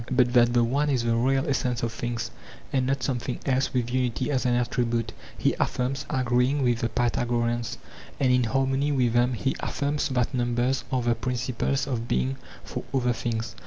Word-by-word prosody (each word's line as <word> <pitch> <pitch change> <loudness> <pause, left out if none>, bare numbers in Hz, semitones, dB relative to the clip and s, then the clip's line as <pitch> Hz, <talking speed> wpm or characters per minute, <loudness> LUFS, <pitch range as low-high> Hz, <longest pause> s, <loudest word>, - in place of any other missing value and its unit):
But 125 -1 +3
that 120 -1 +5
the 120 -1 +4
one 140 +5 +1
is 130 -4 +1
the 115 -1 +2
real 135 +3 +2
essence 125 -4 0
of 115 - 0
things, 115 -1 -3 0.4
and 130 -2 +2
not 135 -1 0
something 125 -1 -2
else 130 0 +1
with 120 -1 -1
unity 130 +1 0
as 130 -2 +1
an 120 - +3
attribute, 120 -1 0 0.2
he - - +2
affirms, 135 +3 -1
agreeing 130 +1 +2
with 120 -2 +2
the 115 - 0
Pythagoreans; 120 0 0 0.4
and 130 -2 +3
in 125 -1 +3
harmony 135 +4 +1
with 125 -4 +2
them 120 +1 +3
he 135 +3 -1
affirms 145 +1 -1
that 125 +1 0
numbers 120 +1 0
are 130 -2 +1
the 120 0 +3
principles 125 +3 -1
of 120 -4 -3
being 65 - 0 0.3
for - - -5
other 125 -2 +2
things. 115 -1 -3
125 Hz, 185 wpm, -26 LUFS, 120-130 Hz, 0.4 s, that